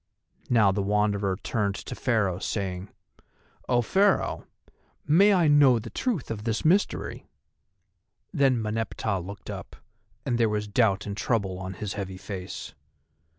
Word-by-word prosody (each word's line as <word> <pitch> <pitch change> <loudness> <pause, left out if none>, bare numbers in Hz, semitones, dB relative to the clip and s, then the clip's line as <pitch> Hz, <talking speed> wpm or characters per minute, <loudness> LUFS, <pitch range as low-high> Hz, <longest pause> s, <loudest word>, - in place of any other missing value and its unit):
Now 110 -5 +5
the 100 +1 -1
Wanderer 100 -1 +1
turned 100 -3 -1
to - - -7
Pharaoh 105 -7 0
saying: 95 -2 -3 0.8
"O 120 -1 +3
Pharaoh, 195 - +1 0.6
may 190 +8 +5
I 180 -5 +4
know 145 -4 +6
the 115 0 -7
truth 220 - -2
of 105 -2 -5
this 115 +3 -2
mystery?" 190 +6 +1 1.1
Then 135 -6 +3
Meneptah 110 -2 -2
looked 100 +3 -8
up, - - -8 0.5
and 120 -1 0
there 115 -2 +3
was 105 0 -2
doubt 105 -2 +2
and 100 - -4
trouble 100 -4 -1
on 95 0 -6
his 105 -2 -4
heavy 95 -2 -5
face. 95 -1 -7
105 Hz, 140 wpm, -26 LUFS, 100-125 Hz, 1.1 s, know